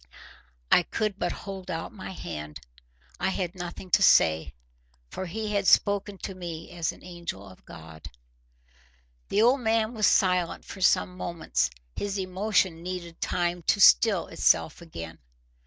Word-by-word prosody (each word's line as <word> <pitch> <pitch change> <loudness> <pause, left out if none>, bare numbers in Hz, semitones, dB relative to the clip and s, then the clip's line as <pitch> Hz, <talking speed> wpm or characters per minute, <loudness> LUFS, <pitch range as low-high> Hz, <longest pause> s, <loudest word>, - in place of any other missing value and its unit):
I - - +7
could 210 +3 -3
but 175 - 0
hold 195 -2 -8
out 165 -2 -4
my 195 -4 -8
hand. 75 - -7 0.6
I 190 - +1
had 185 -2 -2
nothing 180 0 -8
to 205 - +5
say. 80 - +4 0.6
For 190 - -5
he 210 +4 -4
had 200 -2 0
spoken 205 -1 +3
to 195 - -4
me 170 -3 -7
as 170 -2 -2
an - - -16
angel 170 - -7
of 95 - -16
God. 80 -1 -11 1.2
The 210 - +3
old 250 +4 +4
man 225 0 +1
was 215 -3 +2
silent 180 -3 +2
for 190 - -9
some 180 0 +3
moments: 115 - -1 0.3
his 200 0 -3
emotion 190 -2 0
needed 175 -2 -6
time 175 0 -1
to - - +3
still - - +6
itself 80 - +1
again. 85 - -9
180 Hz, 150 wpm, -27 LUFS, 165-195 Hz, 1.2 s, I